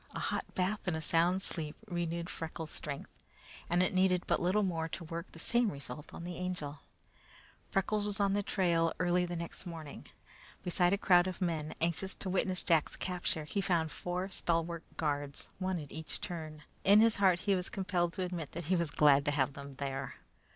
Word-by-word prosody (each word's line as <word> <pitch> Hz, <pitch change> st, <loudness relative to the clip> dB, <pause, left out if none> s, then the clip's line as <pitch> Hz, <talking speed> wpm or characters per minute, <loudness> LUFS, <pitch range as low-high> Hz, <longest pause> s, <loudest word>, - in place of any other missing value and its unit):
A -, -, -2 dB
hot -, -, -2 dB
bath 190 Hz, +2 st, 0 dB
and 165 Hz, -3 st, +1 dB
a -, -, -2 dB
sound 165 Hz, +3 st, +3 dB
night's 190 Hz, -, -3 dB
sleep 155 Hz, -3 st, -3 dB
renewed 170 Hz, -3 st, -2 dB
Freckles' 160 Hz, -2 st, -5 dB
strength, 140 Hz, -2 st, -5 dB, 0.6 s
and 175 Hz, +1 st, +4 dB
it 185 Hz, -, 0 dB
needed 185 Hz, -1 st, +3 dB
but -, -, +1 dB
little 190 Hz, +4 st, +3 dB
more 165 Hz, -4 st, -1 dB
to 170 Hz, -, -5 dB
work 165 Hz, +2 st, -6 dB
the -, -, -12 dB
same 235 Hz, +5 st, +2 dB
result 140 Hz, 0 st, -7 dB
with -, -, -8 dB
the 175 Hz, 0 st, -5 dB
Angel. 180 Hz, -6 st, -3 dB, 0.9 s
Freckles 205 Hz, +2 st, +1 dB
was 205 Hz, 0 st, 0 dB
on 200 Hz, -1 st, +3 dB
the 205 Hz, -, +2 dB
trail 170 Hz, -5 st, +2 dB
early 180 Hz, 0 st, +3 dB
the 175 Hz, -, -3 dB
next 170 Hz, +2 st, -6 dB
morning. 160 Hz, -4 st, -8 dB, 0.6 s
Besides 180 Hz, +1 st, +3 dB
a -, -, -4 dB
crowd 180 Hz, -2 st, +5 dB
of 185 Hz, -, -4 dB
people 160 Hz, -4 st, -1 dB
anxious 170 Hz, +3 st, 0 dB
to 185 Hz, -, -4 dB
witness 185 Hz, -1 st, +1 dB
Jack's 165 Hz, -4 st, +3 dB
capture, 180 Hz, -4 st, -1 dB
he 195 Hz, +7 st, -1 dB
found 170 Hz, -4 st, +1 dB
four 180 Hz, +2 st, -3 dB
stalwart 170 Hz, -1 st, 0 dB, 0.2 s
guards, 145 Hz, -2 st, -1 dB
one 185 Hz, -2 st, 0 dB
at 145 Hz, -2 st, -8 dB
each 160 Hz, 0 st, -5 dB
turn. 155 Hz, -3 st, -6 dB, 0.2 s
In 200 Hz, +2 st, +7 dB
his 225 Hz, 0 st, +5 dB
heart 185 Hz, -3 st, +4 dB
he 200 Hz, -, +2 dB
was 180 Hz, -1 st, -1 dB
compelled 180 Hz, -3 st, 0 dB
to 185 Hz, -, -2 dB
admit 175 Hz, -5 st, -4 dB
that 170 Hz, 0 st, -4 dB
he 185 Hz, +4 st, +2 dB
was 170 Hz, -3 st, +1 dB
glad 145 Hz, -1 st, +5 dB
to 145 Hz, -, +3 dB
have 140 Hz, -1 st, +1 dB
them 140 Hz, 0 st, -9 dB
there. 135 Hz, -1 st, -4 dB
175 Hz, 200 wpm, -33 LUFS, 160-185 Hz, 0.9 s, In